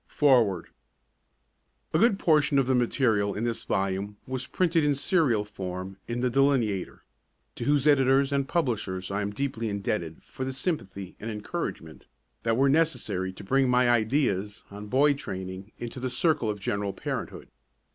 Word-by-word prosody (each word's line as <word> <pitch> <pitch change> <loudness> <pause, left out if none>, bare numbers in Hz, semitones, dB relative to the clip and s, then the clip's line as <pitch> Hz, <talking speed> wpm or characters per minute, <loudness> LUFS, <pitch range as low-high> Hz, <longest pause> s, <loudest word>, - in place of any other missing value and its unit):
FOREWORD 115 - +3 1.2
A - - +3
good 225 -3 +4
portion 150 -5 +3
of 135 - +4
the 130 - +1
material 115 -4 +1
in 105 - -3
this 120 -1 -1
volume 100 +1 -1
was 130 0 -4
printed 165 0 +1
in 145 -1 +2
serial 135 - +2
form 95 -2 -6
in 120 +1 -3
The 125 - +2
Delineator, 125 -8 +1 0.5
to - - -6
whose 145 -1 +2
editors 135 -1 +4
and 140 -1 0
publishers 105 - -1
I 100 +1 -1
am 100 - -1
deeply 115 -1 -3
indebted 100 -5 -3
for 130 - -7
the 130 0 -3
sympathy 100 - -3
and 115 - -5
encouragement 105 - -5 0.3
that 115 0 +1
were 135 +1 +4
necessary 140 - +1
to 95 - -12
bring 135 +5 +2
my 125 0 +4
ideas 110 -3 0
on 105 +1 -8
boy 140 +6 +4
training 95 -6 -7
into 120 +2 -6
the 130 +1 -2
circle 135 -2 +1
of 105 -1 -3
general 100 0 -2
parenthood. - - -5
120 Hz, 160 wpm, -27 LUFS, 100-140 Hz, 1.2 s, good